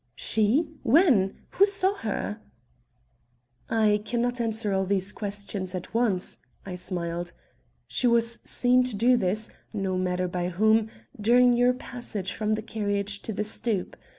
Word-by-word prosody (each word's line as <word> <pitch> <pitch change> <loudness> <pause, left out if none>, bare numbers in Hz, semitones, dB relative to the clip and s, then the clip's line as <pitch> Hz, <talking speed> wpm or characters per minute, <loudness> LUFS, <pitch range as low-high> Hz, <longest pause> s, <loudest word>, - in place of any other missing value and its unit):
"She? 220 +9 +1
When? 235 - +3
Who 400 - +5
saw 395 -1 +1
her?" 215 - -3 1.3
"I 215 -2 +3
can 235 +3 -2
not 245 +1 0
answer 220 -3 0
all 190 0 +1
these 195 0 0
questions 200 -3 -4
at 180 - -6
once," 220 -6 0 0.3
I 190 - -6
smiled. 175 -1 -4 0.5
"She 250 - 0
was 235 0 +2
seen 250 0 +3
to 250 -4 -3
do 240 +5 +4
this 215 +1 0 0.2
no 190 -3 -1
matter 180 0 0
by 180 0 -2
whom, 220 +4 +3 0.3
during 245 +3 +5
your 245 +1 +4
passage 240 -6 -5
from 215 0 -1
the 215 0 -2
carriage 205 -2 -2
to - - -5
the 210 - -2
stoop. 210 -2 -2
215 Hz, 150 wpm, -26 LUFS, 195-235 Hz, 1.3 s, Who